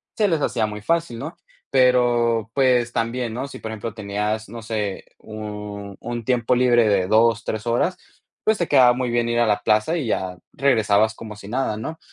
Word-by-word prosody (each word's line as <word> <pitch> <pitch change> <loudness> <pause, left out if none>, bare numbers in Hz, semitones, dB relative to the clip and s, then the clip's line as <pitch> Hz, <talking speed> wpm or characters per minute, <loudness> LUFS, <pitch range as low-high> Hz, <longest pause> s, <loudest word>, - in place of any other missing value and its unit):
se 210 - +2
les 165 -5 +1
hacía 115 -5 0
muy 105 0 -7
fácil, 165 -1 -1
¿no? 160 +7 -6 0.4
Pero, 120 -3 +3
pues, 125 -3 +2
también, 115 0 -2
¿no? 130 +4 -4
Si, - - -10
por 110 - -6
ejemplo, 110 0 -5
tenías, 105 0 -3
no 115 +1 -8
sé, 105 -3 -3
un 105 -2 -7
un 120 0 -4
tiempo 120 -2 +1
libre 120 -2 +4
de 95 -3 +2
2, 115 +2 +3
3 110 0 -3
horas, 120 +10 +1 0.5
pues 220 0 +2
te 175 - -1
quedaba 130 -4 +6
muy 125 0 -2
bien 120 0 +1
ir 120 0 +1
a 120 - +4
la 105 -1 +1
plaza 110 +10 +2
y 145 -7 -3
ya 95 -4 -2 0.2
regresabas 110 -5 +2
como 110 -2 -9
si 105 -1 -12
nada, 120 -3 -1
¿no? 155 +9 -6
115 Hz, 200 wpm, -22 LUFS, 105-125 Hz, 0.5 s, quedaba